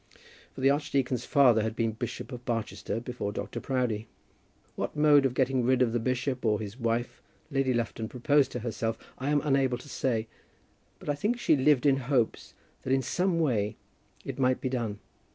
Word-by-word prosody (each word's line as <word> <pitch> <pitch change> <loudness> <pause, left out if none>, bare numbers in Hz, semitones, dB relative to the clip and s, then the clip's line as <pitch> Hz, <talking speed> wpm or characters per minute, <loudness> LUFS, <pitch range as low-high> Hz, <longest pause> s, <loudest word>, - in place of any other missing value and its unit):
For - - -7
the 135 +1 +5
archdeacon's 135 -4 0
father 125 -6 +5
had 110 +1 -2
been 115 -1 0
Bishop 115 +2 -6
of 125 -1 -7
Barchester 115 -3 -3
before 120 -3 -4
Dr. - - -5
Proudie. 120 -4 -1 0.7
What - - -3
mode 150 -2 +5
of 125 - -7
getting 130 -1 +2
rid 130 +1 +3
of 115 -2 0
the 120 - +1
bishop 130 +2 -1
or 105 -3 +2
his 105 -1 -6
wife 115 0 -1 0.3
Lady 135 -1 +1
Lufton 115 -2 -2
proposed 140 +2 +2
to 125 - -3
herself, 115 -1 -2 0.2
I 135 +2 -2
am 145 -1 +3
unable 135 -3 +2
to 125 - -13
say; 115 -5 -1 0.7
but - - -14
I 145 - +2
think 210 +12 -1
she 240 - +4
lived 140 -1 +3
in 135 -2 +5
hopes 125 -3 -1 0.3
that 130 - -4
in 135 0 +3
some 180 +6 0
way 110 -10 +1 0.5
it - - -5
might 130 -1 +2
be 130 - -2
done. 115 -5 -2
125 Hz, 190 wpm, -29 LUFS, 115-135 Hz, 0.7 s, the